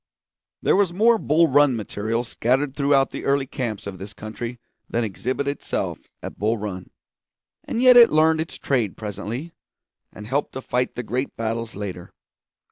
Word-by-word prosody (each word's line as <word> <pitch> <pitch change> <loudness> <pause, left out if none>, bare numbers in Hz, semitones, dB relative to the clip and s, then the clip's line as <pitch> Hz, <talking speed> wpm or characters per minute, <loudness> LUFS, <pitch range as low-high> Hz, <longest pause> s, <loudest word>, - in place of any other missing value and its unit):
There - - +4
was 195 -3 +3
more 225 +5 +4
Bull 160 0 +4
Run 145 -2 +4
material 110 +2 -2
scattered 130 +4 0
through 140 -1 0 0.2
the - - -6
early 140 0 +2
camps 120 -5 -4
of 95 -2 -7
this 100 +2 -8
country 115 +3 -6 0.3
than 120 - 0
exhibited 130 +7 -2
itself 145 - -3 0.2
at - - -7
Bull 110 +3 +1
Run. 100 -3 -6 0.8
And 235 - -1
yet 250 -1 +8
it 235 -1 +9
learned 160 +1 +3
its 160 - -5
trade 120 -8 -1
presently, 115 - -5 0.6
and 105 - -10
helped 135 +6 -1
to 130 - -5
fight 125 0 -1
the 125 - -4
great 125 +4 -3
battles 115 0 -3
later. 95 -3 -6
125 Hz, 165 wpm, -23 LUFS, 110-145 Hz, 0.8 s, it